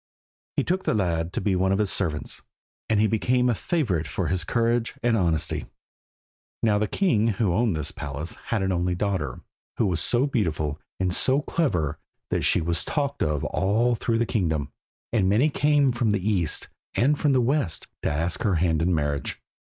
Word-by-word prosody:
He - - +3
took 185 +2 -1
the - - +1
lad 85 -4 0
to - - -2
be 100 -3 +1
one 95 +1 +2
of 95 - +2
his 105 -2 +1
servants, 80 -6 -2 0.5
and 110 - +3
he 110 - +4
became 125 +4 +2
a 120 - +3
favourite 105 - -1
for - - -2
his 90 -2 0
courage 115 +3 0
and 120 -1 +3
honesty. 85 -6 0 1.0
Now 105 -2 +3
the 105 - +1
king 115 - +2
who 100 -7 +2
owned 110 -1 +1
this 75 -2 -3
palace 75 +3 -5
had 110 -4 0
an 95 - 0
only 90 0 0
daughter, 90 -10 -2 0.4
who 115 - +2
was 90 -4 0
so 120 - +2
beautiful 80 - -1 0.2
and 90 -1 0
so 135 +8 +4
clever 85 - 0 0.3
that - - +1
she - - +2
was 85 +1 0
talked 140 -2 -2
of 75 -2 0
all 110 +6 +1
through 115 0 0
the 115 - +1
kingdom, 80 -9 -1 0.4
and 100 -5 +3
many 125 +10 +3
came 145 -2 +3
from 120 -3 +1
the 100 -1 -1
east 90 -8 +1 0.3
and 145 +5 +2
from 145 -3 +3
the 130 - +4
west 125 - 0 0.2
to - - 0
ask 80 +3 -1
her 100 -4 +2
hand 80 -1 +1
in 85 +1 +2
marriage. 75 -2 -2
100 Hz, 190 wpm, -25 LUFS, 85-120 Hz, 1.0 s, he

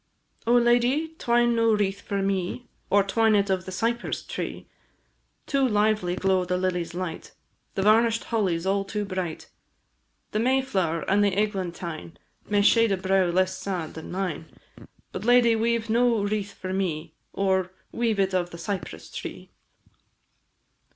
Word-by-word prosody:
Oh, 240 - +5
lady! 245 +6 +3
twine 240 0 +3
no 230 -1 +3
wreath 200 -1 -1
for 200 -1 -2
me, 195 +5 -2 0.2
Or 200 0 +4
twine 220 +2 +2
it 200 -1 +2
of 185 -1 -1
the 185 - -6
cypress 230 +5 -2
tree! - - -5 0.8
Too 275 -2 +2
lively 210 -5 +1
glow 190 -1 +2
the 180 0 -1
lilies' 180 -2 -2
light, 180 -1 -5 0.4
The 195 - 0
varnish'd 225 +2 +4
holly 200 -7 0
's 165 - -7
all 195 +1 +1
too 205 +1 -3
bright, 185 -4 -4 0.8
The 215 - 0
mayflower 230 -10 +1
and 205 +1 +3
the 200 -2 +1
eglantine 175 -5 -3 0.3
May 205 -1 +3
shade 230 +1 +5
a 195 - +2
brow 190 0 +2
less 185 +2 +1
sad 180 -5 -4
than 160 - -8
mine; 180 -4 -3 0.6
But, - - -6
lady, 240 0 +5
weave 230 0 0
no 230 -1 +2
wreath 205 -1 -2
for 185 0 -5
me, 165 -4 -2 0.2
Or 190 -2 0 0.2
weave 230 -3 0
it 190 -1 +1
of 180 -1 0
the 170 - -9
cypress 165 - -5
tree! - - -8
195 Hz, 155 wpm, -26 LUFS, 185-225 Hz, 0.8 s, Oh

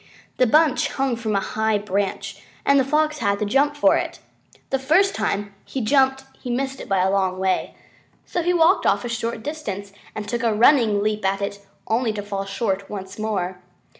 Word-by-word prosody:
The 255 - +4
bunch 305 +2 +3
hung 270 -2 0
from 220 -2 -2
a - - +3
high 220 +2 0
branch, 200 -1 -3 0.2
and 280 0 +5
the - - +4
Fox 305 +2 +1
had 200 -4 +1
to 210 - -1
jump 280 +7 +2
for 290 - +4
it. - - -3 0.5
The 270 - +1
first 355 +9 +3
time 205 0 -2
he 270 - -5
jumped 265 +2 +2 0.2
he 250 - -6
missed 265 +2 -2
it - - -9
by 190 -2 +2
a 190 - +2
long 190 -2 +1
way. 190 0 -1 0.5
So 350 - -2
he 350 +2 +1
walked 350 +2 +4
off - - +2
a - - -3
short 230 -1 -3
distance 200 -10 -5 0.2
and 210 -1 -5
took 235 +3 -2
a 230 -3 +1
running 225 -4 +4
leap 215 0 -1
at 195 +1 +1
it, 200 0 -4 0.2
only 230 0 +1
to 205 -1 -4
fall 200 -1 -4
short 195 -1 -2
once 190 0 -7
more. 190 -4 -2
220 Hz, 200 wpm, -22 LUFS, 200-270 Hz, 0.5 s, and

